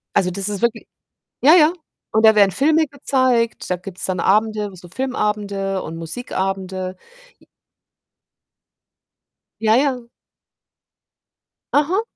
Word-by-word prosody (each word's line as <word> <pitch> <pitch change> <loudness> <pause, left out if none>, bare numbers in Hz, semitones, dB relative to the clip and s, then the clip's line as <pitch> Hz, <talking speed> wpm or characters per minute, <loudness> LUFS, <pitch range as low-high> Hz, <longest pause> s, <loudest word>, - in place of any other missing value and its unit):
Also, 180 -1 +2
das 195 +2 -3
ist 200 -2 -4
wirkli 235 -1 -1 0.6
ja, 300 +5 +7
ja 325 -2 +6 0.4
und 220 +1 +2
da 220 0 +8
werden 200 -2 +5
Filme 315 - +2
gezeigt, 255 -4 0
da 180 - +1
gibt's 180 +1 -9
dann 185 -2 -1
Abende, 210 +1 +1
w 190 - -14
so 175 0 -13
Filmabende 205 -4 -2
und 165 - -7
Musikabende. 185 0 -4 0.4
J - - -25 2.1
Ja, 220 0 +3
ja. 255 -2 0 1.7
Aha. 320 +8 +2
210 Hz, 120 wpm, -20 LUFS, 190-255 Hz, 2.1 s, da